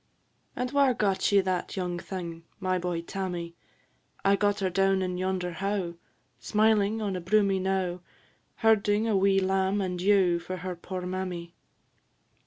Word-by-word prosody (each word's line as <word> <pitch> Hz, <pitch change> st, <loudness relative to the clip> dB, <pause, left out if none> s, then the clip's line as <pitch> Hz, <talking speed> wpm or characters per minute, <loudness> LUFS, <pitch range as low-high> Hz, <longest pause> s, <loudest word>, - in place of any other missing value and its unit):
"And 250 Hz, 0 st, -2 dB
whare 275 Hz, -3 st, +3 dB
got 200 Hz, -4 st, +1 dB
ye 200 Hz, -1 st, +6 dB
that 185 Hz, 0 st, -2 dB
young 180 Hz, -2 st, -2 dB
thing, 170 Hz, -3 st, -6 dB, 0.2 s
My 185 Hz, -1 st, 0 dB
boy, 175 Hz, -1 st, -2 dB
Tammy?" 175 Hz, -3 st, -4 dB, 0.7 s
"I 195 Hz, 0 st, +5 dB
gat 205 Hz, 0 st, +1 dB
her 190 Hz, -1 st, 0 dB
down 195 Hz, +1 st, +2 dB
in 180 Hz, -1 st, -3 dB
yonder 185 Hz, -1 st, -1 dB
howe, 190 Hz, 0 st, -2 dB, 0.5 s
Smiling 215 Hz, -, +2 dB
on 200 Hz, -2 st, -1 dB
a 180 Hz, -, -3 dB
broomy 195 Hz, +1 st, +2 dB
knowe, 185 Hz, -2 st, -1 dB, 0.6 s
Herding 215 Hz, 0 st, +3 dB
a 220 Hz, -, +2 dB
wee 195 Hz, 0 st, +4 dB
lamb 190 Hz, +1 st, +1 dB
and 180 Hz, -2 st, -2 dB
ewe 185 Hz, -3 st, +4 dB
For 185 Hz, +2 st, -6 dB
her 180 Hz, 0 st, -5 dB
poor 180 Hz, +1 st, -6 dB
mammy." 180 Hz, -2 st, -4 dB
190 Hz, 155 wpm, -28 LUFS, 180-200 Hz, 0.7 s, ye